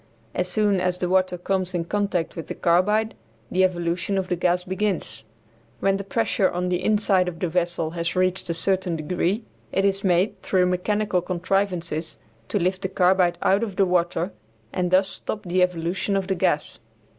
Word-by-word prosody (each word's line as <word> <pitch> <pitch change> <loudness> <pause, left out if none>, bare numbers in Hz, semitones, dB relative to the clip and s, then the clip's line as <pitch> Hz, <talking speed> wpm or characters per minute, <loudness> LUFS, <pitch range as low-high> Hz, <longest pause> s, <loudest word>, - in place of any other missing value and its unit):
As 180 - 0
soon 205 0 +2
as 180 0 0
the 180 - -1
water 185 0 +2
comes 185 0 -1
in 170 -1 -1
contact 200 -3 -1
with 165 - -6
the - - -5
carbide 210 +6 +2 0.4
the 185 +1 +3
evolution 175 +1 0
of 190 -1 -2
the 180 - +1
gas 180 +1 +1
begins. 190 - -2 0.5
When 195 0 +2
the 200 - -5
pressure 205 -1 +1
on 180 +1 -2
the 180 0 -1
inside 205 -4 +3
of 175 -2 -4
the 180 - 0
vessel 170 -1 -1
has 170 0 -2
reached 185 0 0
a 170 - 0
certain 185 0 0
degree 180 +6 -1 0.3
it 195 - +1
is 195 0 +1
made, 185 +1 +1
through 185 -2 +2
mechanical 180 +1 0
contrivances, 175 -3 -2 0.3
to - - -1
lift 185 0 0
the 190 - -2
carbide 180 -1 +3
out 195 +2 +3
of 210 -5 -3
the 195 - +3
water 175 0 0 0.4
and 180 -1 0
thus 190 +1 +4
stop 215 +2 -5
the 180 0 0
evolution 180 +2 0
of 195 -1 0
the 190 - 0
gas. 155 -4 0
185 Hz, 185 wpm, -24 LUFS, 175-195 Hz, 0.5 s, thus